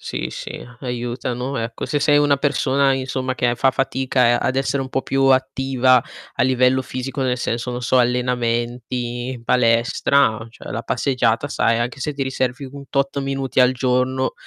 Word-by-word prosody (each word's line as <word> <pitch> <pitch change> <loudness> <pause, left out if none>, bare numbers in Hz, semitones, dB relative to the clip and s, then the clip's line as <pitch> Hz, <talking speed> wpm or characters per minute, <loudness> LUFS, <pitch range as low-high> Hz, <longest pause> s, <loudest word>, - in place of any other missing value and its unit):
Sì, - - -4
sì, - - -7 0.2
aiutano 125 +1 -3
ecco, 115 0 -4
se 145 - -1
sei 145 +1 +4
una 145 -1 +3
persona 140 -1 +2
insomma 130 0 -2
che 120 0 +1
fa 135 +2 +3
fatica 130 -2 +1
a - - -1
ad 130 - 0
essere 135 +1 0
un 135 - -4
po' 135 - -1
più 135 0 0
attiva 130 -1 +3 0.3
a - - +1
livello 130 0 +3
fisico, 130 +2 -5
nel 125 -1 0
senso, 120 0 -3
non 125 0 -5
so, 125 +2 +2
allenamenti, 120 0 -1
palestra, 115 0 +2
cioè - - -11
la 115 - -3
passeggiata 125 0 0
sai, 115 -4 +1
anche 120 +3 -3
se 150 +2 -2
ti 140 - -2
riservi 130 0 -2
un 140 0 -10
tot 140 0 -1
minuti 135 -1 -3
al 125 0 +5
giorno, 130 +1 0
130 Hz, 170 wpm, -21 LUFS, 120-135 Hz, 0.3 s, al